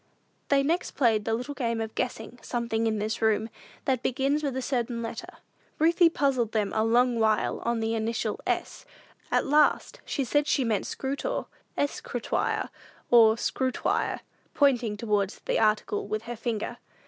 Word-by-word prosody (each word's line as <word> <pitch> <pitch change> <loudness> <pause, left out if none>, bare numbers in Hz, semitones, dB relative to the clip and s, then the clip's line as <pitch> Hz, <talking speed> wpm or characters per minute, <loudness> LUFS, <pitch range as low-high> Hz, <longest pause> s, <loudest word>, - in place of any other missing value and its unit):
They 275 -1 +3
next 335 +5 0
played 225 -6 +2
the 225 - +1
little 250 +5 -4
game 230 -4 -1
of 220 -1 -4
guessing 245 -1 -4
"something 230 -2 -1
in 220 -1 0
this 215 +1 -2
room," 220 0 +2 0.4
that 260 -3 +1
begins 275 +4 0
with 275 -3 -2
a - - 0
certain 240 -3 -1
letter. 230 - -6 0.5
Ruthie 335 +2 +5
puzzled 265 -8 0
them 210 -3 0
a 220 - +2
long 240 +1 +3
while 220 -1 +1
on 235 -1 -1
the 225 0 0
initial 225 -1 -2
S. - - -2 0.5
At - - +2
last 300 - +2
she 275 - -2
said 290 +3 +1
she 280 - +2
meant 220 -5 0
"scrutau" 280 - -3 0.3
(escritoire 285 - -1 0.4
or 225 -2 +7
scrutoire), 255 +2 -1 0.3
pointing 245 -7 +2
towards 205 -3 0
the - - +1
article 215 -2 +1
with 215 +1 -3
her 240 +1 -5
finger. 225 -1 -3
235 Hz, 160 wpm, -27 LUFS, 220-275 Hz, 0.5 s, or